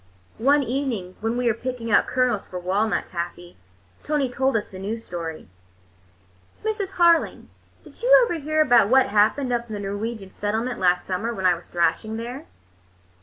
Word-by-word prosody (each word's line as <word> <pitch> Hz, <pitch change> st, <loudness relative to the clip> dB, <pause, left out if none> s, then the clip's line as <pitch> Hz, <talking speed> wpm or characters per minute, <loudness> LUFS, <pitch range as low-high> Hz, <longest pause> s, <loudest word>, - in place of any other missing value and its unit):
One 280 Hz, +4 st, +4 dB
evening 240 Hz, -8 st, -3 dB
when 225 Hz, +2 st, -2 dB
we 250 Hz, -, -1 dB
were 235 Hz, -, +3 dB
picking 240 Hz, -1 st, -5 dB
out -, -, +4 dB
kernels 250 Hz, -5 st, 0 dB
for 180 Hz, -, -7 dB
walnut 195 Hz, +4 st, 0 dB
taffy, 175 Hz, 0 st, -6 dB, 0.5 s
Tony 290 Hz, -4 st, 0 dB
told 265 Hz, -1 st, +1 dB
us 210 Hz, -, -6 dB
a 185 Hz, -, -8 dB
new 205 Hz, +4 st, -3 dB
story. 170 Hz, -7 st, -7 dB, 1.2 s
"Mrs. 420 Hz, -3 st, -2 dB
Harling, 340 Hz, -1 st, +3 dB, 0.3 s
did -, -, -16 dB
you -, -, +1 dB
ever 345 Hz, -8 st, -3 dB
hear 310 Hz, +1 st, +1 dB
about 240 Hz, -8 st, +5 dB
what 265 Hz, +1 st, +4 dB
happened 220 Hz, +6 st, +2 dB
up 235 Hz, 0 st, -1 dB
in 215 Hz, -, -4 dB
the -, -, -5 dB
Norwegian 205 Hz, 0 st, -5 dB
settlement 225 Hz, +4 st, -2 dB
last 180 Hz, -1 st, +2 dB
summer, 195 Hz, +5 st, -2 dB
when 190 Hz, -2 st, -4 dB
I 180 Hz, -, +6 dB
was 170 Hz, 0 st, -9 dB
thrashing 215 Hz, +5 st, 0 dB
there? 245 Hz, +6 st, -7 dB
230 Hz, 170 wpm, -23 LUFS, 195-265 Hz, 1.2 s, I